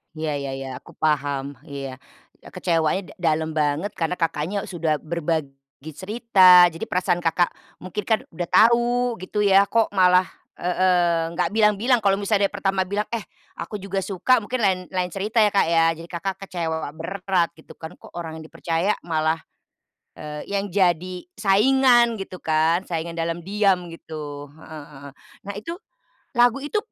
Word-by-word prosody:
Iya 155 -1 -3
iya 140 -1 -4
iya 135 0 -6
aku - - -16
paham, 145 -3 0 0.2
iya, 135 -2 -7 0.4
eee, - - -13
kecewanya 165 +1 +1
da - - -14 0.2
dalam 160 0 -3
banget 155 +5 0
karena 165 +2 -1
Kakaknya 165 +3 -2
sudah 165 -4 -1
berbagi 150 -3 -4
cerita, 185 -1 +6
jadi 165 - -6
perasaan 180 -1 0
Kakak 170 +1 +1 0.3
mungkin 195 +3 -4
kan 220 -1 +3
udah 170 +1 -4
tau 240 +1 +3
gitu 205 +3 -2
ya, 200 0 +5
kok 230 -2 +1
malah 185 -1 +4 0.3
heeh 175 -2 +1
nggak - - +1
bilang-bilang 220 +3 +3
kalau 195 -1 +3
misalnya 200 0 +1
dari - - -33
pertama 195 -1 0
bilang, 205 +2 -1
eh 230 - -1 0.4
aku 210 - -6
juga 195 0 -2
suka 210 +6 +2
mungkin 250 +5 -3
lain 190 -2 +3
lain 180 -2 -2
cerita 210 +4 -4
ya 210 - +3
Kak 195 - +3
ya, 165 -1 +4
jadi 165 +1 -10
Kakak 185 +2 -3
kecewa 160 -4 -3
berat 180 +1 -1
gitu 160 - -14
kan, 160 +2 -9
kok - - -15
orang 160 -1 -6
yang 160 - -10
dipercaya 170 +6 -1
malah, 160 -1 0 0.8
eee, 150 0 -7
yang 200 0 -1
jadi 185 -1 +1 0.2
saingan 240 +3 +4
gitu 190 -2 -7
kan, 160 +3 +2
saingan 165 0 -3
dalam 165 +1 -2
diam 195 -3 +1
gitu, 145 -3 -8
heeh 155 -2 -10
heeh. 140 -1 -11 0.3
Nah 200 - -5
itu, 335 +10 -6 0.6
lagu 245 +2 +4
itu 295 +9 -2
180 Hz, 165 wpm, -23 LUFS, 160-200 Hz, 0.8 s, cerita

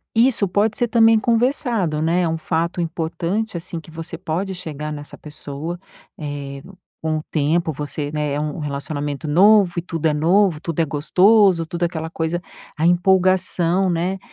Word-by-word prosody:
isso 230 -3 +3
pode 205 +4 +1
ser 240 - +1
também 225 -1 +5
conversado 230 - +1
né, 170 +3 +2
é 170 - +1
um 160 - -1
fato 165 +2 -2
importante 170 +5 -2
assim 170 0 -6
que 160 - -15
você 165 +1 -7
pode 185 +3 -3
chegar 155 -3 -6
nessa 145 0 -9
pessoa, 150 +3 -7 0.4
eh, 140 -2 -6 0.4
com 160 -1 -1
o 155 - -5
tempo, 160 +2 +1
você 145 0 -5
né, 150 -2 -2
é 145 - -1
um 150 +1 -3
relacionamento 145 +1 -4
novo 195 +3 +5
e - - +1
tudo 165 -2 -5
é 155 - +2
novo, 170 +2 +3
tudo 165 -1 -2
é - - +2
gostoso, 180 +4 +4
tudo 170 +2 -7
é - - +5
aquela 160 -1 -5
coisa, 165 +1 -2 0.4
a 160 - 0
empolgação, 185 0 +2
né. 180 +3 -1
165 Hz, 170 wpm, -21 LUFS, 155-190 Hz, 0.4 s, também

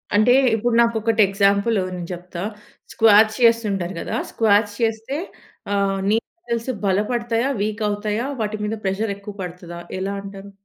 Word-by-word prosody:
అంటే 215 +4 +5 0.2
ఇప్పుడు 230 +2 0
నాకు 230 -1 +2
ఒకటి 225 0 +2
ఎగ్జాంపుల్ 200 +3 +2 0.2
నేను 175 -1 -6
చెప్తా. 175 0 -8 0.5
స్క్వాట్స్ 220 0 +5
చేస్తుంటారు 210 -6 +2
కదా, - - -4 0.2
స్క్వాట్స్ 205 -1 +2
చేస్తే 225 +5 -1 0.6
ఆహ్, 195 -1 +1
నీ 220 - +4 0.3
మసిల్స్ 235 +2 -1
బలపడతా? 225 +4 0 0.2
వీక్ 215 +1 -2
అవుతాయా? 210 +3 -2 0.2
వాటి 215 0 -2
మీద 215 +1 -2
ప్రెషర్ 200 +2 -1
ఎక్కువ 200 +1 -9
పడతదా? 175 -1 -7 0.2
ఎలా 195 +1 -2
అంటారు? 200 0 -10
210 Hz, 140 wpm, -21 LUFS, 195-225 Hz, 0.6 s, అంటే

